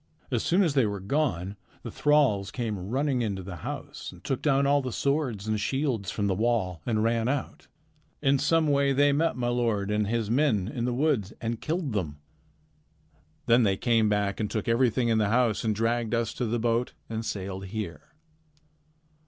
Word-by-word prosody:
As 120 -3 +1
soon 185 +4 +3
as 165 -6 +1
they 135 -6 +3
were 100 -1 -3
gone, 100 - -1 0.3
the - - -6
thralls 140 -10 +2
came 105 -6 -4
running 135 +1 0
into 100 -4 -2
the 90 -1 -7
house - - -6
and - - -16
took 135 - -2
down 140 -2 +3
all 140 +1 +3
the 130 -1 -4
swords 130 -7 -1
and 110 -1 0
shields 130 -4 -1
from 105 - -2
the 100 - +2
wall 95 -5 0
and 110 -2 +1
ran 115 0 +1
out. 140 +1 -3 0.5
In 140 -2 +2
some 160 +3 +3
way 140 -1 +2
they 145 +1 +4
met 160 +3 +1
my 120 -1 0
lord 115 -5 0
and 105 -1 +1
his 115 0 -1
men 115 -5 +2
in 120 +1 -3
the 125 - 0
woods 125 -8 +1
and 115 0 -3
killed 160 -5 -2
them. 80 -8 -2 1.3
Then 120 0 +5
they 100 -4 +2
came 115 -2 +2
back 105 -1 0
and 105 -2 -1
took 110 -3 -3
everything 120 0 +2
in 110 -1 +3
the 105 -2 +2
house 120 -1 +2
and 110 -2 0
dragged 115 +1 0
us 115 -1 -1
to 125 - -2
the 120 +2 0
boat 115 +1 0
and 110 0 -4
sailed 95 -2 -4
here." 95 - -6
115 Hz, 195 wpm, -27 LUFS, 105-135 Hz, 1.3 s, Then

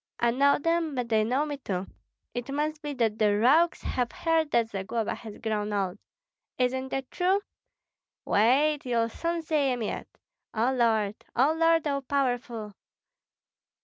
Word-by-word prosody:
I 235 0 +3
know 280 +3 +4
them, 330 -1 0
but 245 -2 -2
they 220 -1 +3
know 255 +7 +1
me 290 -1 -4
too. 190 -8 -3 0.5
It 245 +1 -5
must 300 +2 -2
be 295 -2 -4
that 225 -3 0
the 205 -1 +3
rogues 300 +10 +4
have 245 -2 -1
heard 325 -2 +1
that 230 -5 +2
Zagloba 205 +3 -2
has 220 -3 -9
grown 215 -2 -2
old. 195 -1 -1 0.6
Isn't 260 +1 0
that 270 -1 -4
true? 380 +2 +2 0.8
Wait! 280 +8 +3
you'll 230 -2 0
see 320 -2 0
him 245 -2 -2
yet! 210 - -4 0.5
O 235 +4 +2
Lord! 220 -4 +1
O 270 +6 +4
Lord, 330 0 +3
all 280 -1 0
Powerful! 245 -6 -2
250 Hz, 150 wpm, -28 LUFS, 220-295 Hz, 0.8 s, know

